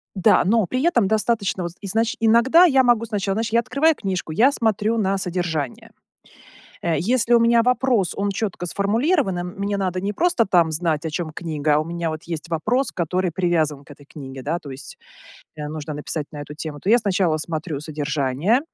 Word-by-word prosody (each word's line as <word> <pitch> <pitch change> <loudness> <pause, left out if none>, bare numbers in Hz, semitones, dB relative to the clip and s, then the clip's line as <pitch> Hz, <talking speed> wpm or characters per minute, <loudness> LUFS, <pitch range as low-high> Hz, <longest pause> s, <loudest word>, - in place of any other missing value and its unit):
Да, 185 - +4
но 215 +2 +2
при 255 +7 -2
этом 240 - +3
достаточно, 215 -3 0
вот, 170 0 -5
изнач 220 +3 0
иногда 235 +10 +5
я 270 -5 +4
могу 235 -2 +3
сначала, 200 -3 -2
знаешь, 225 +1 -1
я 230 - +4
открываю 300 +6 +2
книжку. 185 -5 -4
Я 245 - +4
смотрю 220 -2 0
на 195 -2 +1
содержание. 170 -7 -3 0.9
Э, 170 -2 0
если 240 +5 +1
у 235 - +6
меня 230 0 +4
вопрос, 250 -6 +1
он 200 0 -1
чётко 195 -3 -3
сформулирован, 215 - +1
и - - -3
мне 200 +3 -3
надо 185 -2 -1
не 200 +1 -1
просто 340 - +2
там 170 -4 +3
знать, 160 -1 -1
о - - -1
чём 155 0 -4
книга, 155 -3 -2
а - - +3
у 155 - -2
меня, 170 -1 -3
вот, 155 0 -6
есть 165 0 -5
вопрос, 225 - 0
который 180 +1 -1
привязан 160 -5 0
к - - -14
этой 145 0 -19
книге, 135 -3 -8
да, 165 +4 -2
то 145 - -11
есть, 135 +1 -10 0.6
э, 150 - -4
нужно 155 -1 -6
написать 150 0 -4
на 150 - -8
эту 150 +1 -9
тему, 150 -2 -6
то 200 - -1
я, 240 - +6
сначала 185 -6 +1
смотрю 155 -2 -4
содержание. 150 - 0
185 Hz, 200 wpm, -22 LUFS, 160-225 Hz, 0.9 s, у